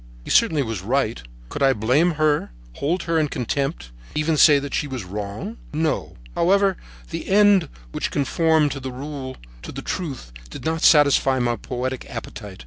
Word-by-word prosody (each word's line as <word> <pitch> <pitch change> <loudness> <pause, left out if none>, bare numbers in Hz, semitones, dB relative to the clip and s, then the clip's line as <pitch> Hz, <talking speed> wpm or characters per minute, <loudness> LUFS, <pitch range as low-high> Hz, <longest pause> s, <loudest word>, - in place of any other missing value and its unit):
He - - -6
certainly 150 -3 +4
was 110 -6 -4
right. 120 - 0 0.3
Could - - -6
I 135 -1 +5
blame 130 +11 +2
her, 155 -1 +1 0.3
hold 170 +5 -1
her 165 -1 +1
in 155 - +2
contempt, 125 - -3 0.2
even 150 +1 +1
say 150 -1 +7
that 140 0 -4
she 145 - 0
was 130 -6 -5
wrong? 105 - -6 0.2
No. 155 0 -1 0.2
However, 195 +2 +3 0.4
the 165 0 -5
end 200 -5 +5 0.2
which - - -2
conformed 155 +1 +2
to 140 - -4
the 130 0 -6
rule, 130 0 -6 0.2
to - - -8
the - - -7
truth, 135 - -5 0.2
did - - -9
not 160 0 -1
satisfy 140 -3 +5
my 120 -1 +1
poetic 130 +1 -4
appetite. 105 -5 -8
140 Hz, 170 wpm, -22 LUFS, 125-160 Hz, 0.4 s, say